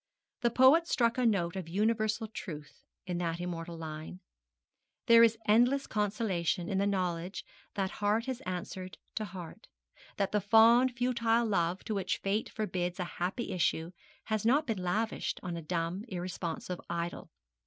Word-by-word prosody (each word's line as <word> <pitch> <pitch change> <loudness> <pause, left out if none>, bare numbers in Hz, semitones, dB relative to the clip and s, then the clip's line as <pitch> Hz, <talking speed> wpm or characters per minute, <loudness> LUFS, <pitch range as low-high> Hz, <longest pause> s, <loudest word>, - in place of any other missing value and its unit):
The 235 - +3
poet 265 +8 +6
struck 235 -3 +2
a 250 - +4
note 180 -5 +1
of 185 -4 -5
universal 215 +3 +1
truth 155 -8 -8 0.2
in 180 -1 -2
that 170 -1 -2
immortal 170 -1 -5
line. 160 +2 -7 0.9
There 230 0 +8
is 230 -1 +5
endless 245 +6 +4
consolation 195 -5 -1
in 190 -1 0
the 200 - +2
knowledge 180 -2 -2 0.3
that 190 -2 -1
heart 210 +3 +2
has 260 -2 -4
answered 185 -1 -5 0.2
to 215 - -2
heart; 180 -5 -9 0.5
that 200 -1 0
the 210 - +1
fond 230 +4 +5
futile 235 -1 +2
love 180 -4 0
to 220 - -3
which 190 -2 -1
Fate 200 +3 -1
forbids 180 -4 -3
a - - 0 0.2
happy 190 +7 -2
issue 170 -1 0 0.3
has 215 -2 -1
not 275 +7 +3
been 220 -7 -2
lavished 210 +5 -1
on 175 -2 -3
a 170 - -5
dumb, 170 +4 -2
irresponsive 180 -2 -4
idol. 170 0 -4
195 Hz, 155 wpm, -31 LUFS, 175-225 Hz, 0.9 s, There